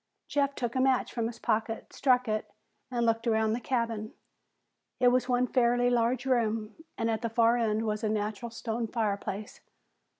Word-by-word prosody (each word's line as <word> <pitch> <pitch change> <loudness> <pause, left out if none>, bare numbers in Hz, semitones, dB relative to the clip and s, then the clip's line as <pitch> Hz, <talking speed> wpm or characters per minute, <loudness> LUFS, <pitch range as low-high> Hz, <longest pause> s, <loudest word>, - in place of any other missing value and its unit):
Jeff 280 -1 0
took 240 -2 -2
a 260 - +2
match 260 -1 +2
from 230 -2 -1
his 235 - -7
pocket, 225 +1 -2
struck 250 -2 +2
it, 215 0 -2 0.4
and 240 -2 0
looked 230 +1 +1
around 220 -1 +2
the 235 - -1
cabin. 230 -3 -2 0.9
It 250 -1 +6
was 250 +1 +1
one 250 0 +3
fairly 245 0 +2
large 240 +2 +1
room, 225 -4 0 0.2
and 225 - 0
at 225 -1 0
the 230 - -1
far 230 +1 +4
end 220 -2 +1
was 215 0 -2
a 215 - +1
natural 215 +2 -2
stone 230 0 -3
fireplace. 210 -2 -3
230 Hz, 175 wpm, -29 LUFS, 220-245 Hz, 0.9 s, It